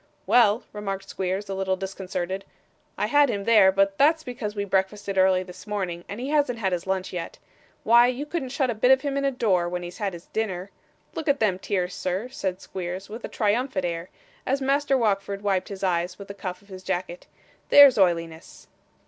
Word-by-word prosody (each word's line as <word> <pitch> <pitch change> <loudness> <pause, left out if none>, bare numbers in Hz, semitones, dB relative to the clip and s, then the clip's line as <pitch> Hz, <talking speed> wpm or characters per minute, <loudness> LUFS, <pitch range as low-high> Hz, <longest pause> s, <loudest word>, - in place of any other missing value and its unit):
'Well,' 230 -1 +4
remarked 195 -2 -5
Squeers, 190 +2 -3
a 195 - -4
little 190 0 0
disconcerted, 190 0 -4 0.5
'I - - 0
had 290 -1 +4
him 200 -3 -2
there; 210 -3 +6
but 195 0 +1
that's 315 +3 +4
because 240 -5 -5
we 200 -1 -2
breakfasted 195 +1 -1
early 185 -1 +4
this 185 +2 -12
morning, 185 -5 -3
and 205 - -6
he 260 +3 -4
hasn't 290 -5 +1
had 190 -4 -1
his 175 +1 -3
lunch 190 -1 -2
yet. 175 -2 -5 0.5
Why 235 +2 +6
you 255 +3 -2
couldn't 295 -4 -3
shut 265 -1 0
a - - -1
bit 225 +3 +2
of 265 0 +6
him 280 -1 -2
in 280 0 0
a - - +3
door, 190 -9 +1
when 180 0 -4
he's 175 +4 -8
had 200 -3 -2
his 170 0 -10
dinner. 200 -3 -3 0.4
Look 320 - -5
at 285 -1 +2
them 195 -4 +1
tears, 180 -2 -2
sir,' 190 +7 -3
said 190 -7 -4
Squeers, 185 +1 -6
with 225 +3 -8
a - - -3
triumphant 215 -2 0
air, 170 +1 -4 0.3
as 270 +2 0
Master 275 0 +2
Wackford 200 -3 -1
wiped 195 -2 0
his 195 -1 -7
eyes 180 0 0
with 200 -1 -11
the - - -5
cuff 185 -1 -6
of 200 - -24
his 185 -1 -9
jacket, 180 -2 -4 0.4
'there's 280 -6 +8
oiliness! 165 -3 -1
195 Hz, 210 wpm, -25 LUFS, 185-240 Hz, 0.5 s, there's